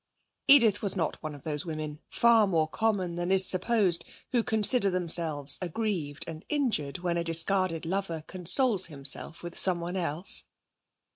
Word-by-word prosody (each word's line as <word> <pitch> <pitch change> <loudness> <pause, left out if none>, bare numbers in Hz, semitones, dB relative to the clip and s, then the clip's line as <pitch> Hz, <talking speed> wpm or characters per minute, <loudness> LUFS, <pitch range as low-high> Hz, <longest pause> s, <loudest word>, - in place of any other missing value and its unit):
Edith 235 -8 +5
was 200 -2 +1
not 165 -5 -3
one 155 -1 -7
of 140 - -15
those 150 -2 -3
women, 155 -2 -6
far 230 -3 +3
more 160 -4 0
common 190 -2 -2
than 175 +1 -3
is 190 0 +5
supposed, 190 -2 +1 0.3
who 245 -2 +2
consider 220 -1 +1
themselves 165 -6 +3
aggrieved 175 -6 -4
and 160 0 -9
injured 235 - -1
when 175 -1 -3
a 170 - -2
discarded 165 0 0
lover 170 -3 -4
consoles 185 +4 +1
himself 145 +2 -2
with 175 0 -8
someone 175 -1 +1
else. 170 0 +1
175 Hz, 150 wpm, -27 LUFS, 160-200 Hz, 0.3 s, Edith